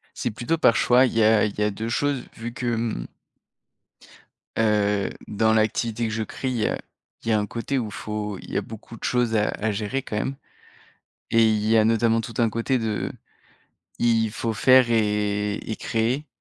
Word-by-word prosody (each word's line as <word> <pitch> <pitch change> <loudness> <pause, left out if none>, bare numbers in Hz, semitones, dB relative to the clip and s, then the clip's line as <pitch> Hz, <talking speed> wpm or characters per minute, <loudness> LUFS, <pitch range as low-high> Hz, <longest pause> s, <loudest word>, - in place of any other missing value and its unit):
C'est 120 - -2
plutôt 125 +9 -2
par 115 - +4
choix, 125 +2 +5
il - - -4
y 115 - +3
a 110 0 +5
il 105 -1 -4
y 105 - +1
a 105 - +2
2 110 +3 -5
choses, 140 +2 0
vu 115 +1 -6
que 120 - -5
mmh 115 - -2 1.5
heu, 105 -2 +2 0.2
dans 110 +1 +2
l'activité 110 +1 +1
que 110 - -4
je 115 - -1
crie, 120 0 -2
heu, - - -1 0.5
il - - -6
y - - +3
a 110 - +4
un 105 - -1
côté 115 +6 -2
où 120 - -2
il 105 - -8
faut 105 -1 -4
il - - -12
y - - -2
a - - +1
beaucoup 115 +1 -10
de - - -11
choses 120 -2 +1
à 105 0 +2
à 110 +1 -2
gérer 105 +6 -2
quand 110 - -5
même, 135 +6 -2 1.0
et 115 0 +5
il 110 -1 +1
y 110 +1 +4
a 110 - +5
notamment 115 0 +3
tout 115 +1 -8
un 115 -2 +3
côté 115 +4 0
de 110 -3 -2 0.9
il 115 -2 +2
faut 115 +1 -2
faire 130 +2 +5
et 105 -2 +1
et 110 - -5
créer, 120 +6 -1
115 Hz, 205 wpm, -24 LUFS, 105-120 Hz, 1.5 s, choix